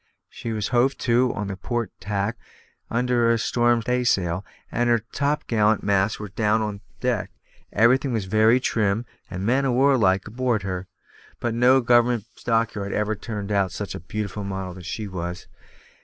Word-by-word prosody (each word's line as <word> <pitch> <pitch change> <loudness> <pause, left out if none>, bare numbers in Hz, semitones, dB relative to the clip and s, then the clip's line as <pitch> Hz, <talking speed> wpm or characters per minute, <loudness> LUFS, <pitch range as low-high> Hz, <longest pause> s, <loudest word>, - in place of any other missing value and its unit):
She 115 - -6
was 105 -2 -2
hove 125 +2 +2
to 125 +1 +2
on 105 - -3
the 100 -1 -4
port 115 +2 -3
tack 100 +3 -2 0.5
under 120 0 +2
a 115 - +4
storm 120 0 +2
staysail, 100 -8 +1 0.3
and 120 0 +1
her 115 -2 +3
topgallant 115 -7 +1
masts 100 +1 +1
were 105 -1 -6
down 105 +3 +1
on 105 -2 -4 0.2
deck. 125 -6 -1 0.4
Everything 130 +5 +3
was 110 -5 -1
very 110 +5 +4
trim 110 -2 0 0.2
and 95 +1 -4
man 130 +5 +2
o' 135 - +1
warlike 120 -8 +3
on 110 - -10
board 120 -4 0
her; 95 -1 -4 0.5
but 120 -1 -1
no 125 +3 +5
government 120 -2 +3 0.2
dockyard 115 -4 0
ever 105 +1 0
turned 105 -1 -5
out 100 -2 +1
such 105 - -5
a - - -6
beautiful 105 +4 -4
model 95 -2 -4
as 90 -2 -10
she 105 +3 -4
was. 90 -1 -5
110 Hz, 170 wpm, -24 LUFS, 100-120 Hz, 0.5 s, no